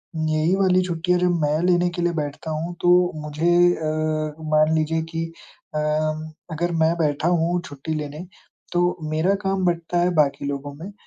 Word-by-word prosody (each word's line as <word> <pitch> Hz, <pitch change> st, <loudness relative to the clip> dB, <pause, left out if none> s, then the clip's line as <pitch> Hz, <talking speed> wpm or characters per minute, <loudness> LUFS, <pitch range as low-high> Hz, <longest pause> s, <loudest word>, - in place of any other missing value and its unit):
उम, 155 Hz, 0 st, -1 dB
यही 155 Hz, +4 st, +2 dB
वाली 185 Hz, -1 st, +3 dB
छुट्टियाँ 175 Hz, +1 st, 0 dB
जब 175 Hz, -1 st, +2 dB
मैं 150 Hz, +1 st, +1 dB
लेने 175 Hz, 0 st, +3 dB
के -, -, -1 dB
लिए 175 Hz, 0 st, +1 dB
बैठता 145 Hz, +2 st, -5 dB
हूँ 165 Hz, +3 st, -3 dB
तो 180 Hz, 0 st, +4 dB
मुझे 155 Hz, +3 st, 0 dB, 0.2 s
अ, 155 Hz, -1 st, -2 dB, 0.2 s
मान 155 Hz, +1 st, +4 dB
लीजिए 160 Hz, +1 st, +1 dB
कि 165 Hz, 0 st, -2 dB, 0.5 s
अम, 155 Hz, +1 st, -1 dB, 0.2 s
अगर 175 Hz, +2 st, -1 dB
मैं 165 Hz, +1 st, +2 dB
बैठा 155 Hz, -1 st, 0 dB
हूँ 175 Hz, 0 st, +1 dB
छुट्टी 145 Hz, +3 st, -5 dB
लेने, 150 Hz, +3 st, -5 dB, 0.5 s
तो 175 Hz, 0 st, +1 dB
मेरा 160 Hz, +6 st, +2 dB
काम 195 Hz, -1 st, 0 dB
बटता 170 Hz, 0 st, 0 dB
है 175 Hz, +1 st, +3 dB
बाकी 140 Hz, -2 st, +2 dB
लोगों 140 Hz, 0 st, -4 dB
में 170 Hz, +7 st, -8 dB
160 Hz, 175 wpm, -23 LUFS, 155-175 Hz, 0.5 s, तो